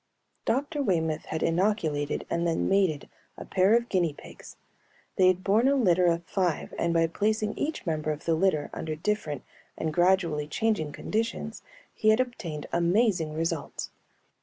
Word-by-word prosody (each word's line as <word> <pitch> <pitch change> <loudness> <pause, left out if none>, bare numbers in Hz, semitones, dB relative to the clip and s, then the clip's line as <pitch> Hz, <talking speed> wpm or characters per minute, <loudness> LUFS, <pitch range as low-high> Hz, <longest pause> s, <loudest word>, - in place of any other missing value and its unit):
Dr. 285 +4 0
Waymoth 160 - 0
had 160 - -3
inoculated 165 -5 0
and 170 0 0
then 165 - 0
mated 190 -7 +1 0.3
a - - -8
pair 190 +3 +3
of 235 0 +1
guinea 175 -8 +1
pigs; - - -13 0.6
they 185 - +5
had 185 0 +2
borne 215 +6 +3
a 280 - +4
litter 180 -8 +3
of 170 0 +1
five 175 -2 -1
and 170 - +1
by 165 0 +3
placing 215 +5 0
each 310 -5 -3
member 155 -2 -1
of 150 0 -6
the 165 - +2
litter 160 -3 +1
under 155 -1 -4
different 155 - -2 0.3
and 160 -1 -2
gradually 175 -4 +2
changing 180 -4 0
conditions, 220 +4 -3 0.3
he 215 - +2
had 220 +2 +5
obtained 175 -12 -3
amazing 175 -2 +2
results. 165 -1 -3
175 Hz, 160 wpm, -27 LUFS, 160-215 Hz, 0.6 s, they